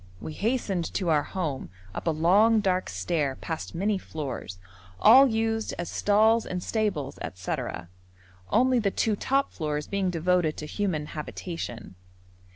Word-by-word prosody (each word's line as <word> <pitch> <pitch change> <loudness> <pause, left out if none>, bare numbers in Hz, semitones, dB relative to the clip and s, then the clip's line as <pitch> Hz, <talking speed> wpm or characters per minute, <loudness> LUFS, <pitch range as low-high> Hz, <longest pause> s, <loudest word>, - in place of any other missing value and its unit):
We 155 - -6
hastened 200 -4 -1
to 180 -4 0
our 150 -2 +4
home, 155 -6 -4 0.2
up - - -5
a - - +5
long 195 +8 +4
dark 185 -3 0
stair, 135 - -1
past 160 +3 -6
many 200 +3 0
floors, 135 - -6 0.4
all 265 - +8
used 225 -1 -1
as 175 -1 -4
stalls 220 +2 +3
and 180 -1 -4
stables, 200 - -2 0.2
&c., 90 - -2 0.9
only 255 - +3
the 205 -3 +1
two 215 +2 0
top 275 +6 0
floors 150 -2 -2
being 200 -2 -1
devoted 175 -2 +1
to 150 - -5
human 165 -3 -2
habitation. 150 - -6
180 Hz, 145 wpm, -27 LUFS, 155-215 Hz, 0.9 s, all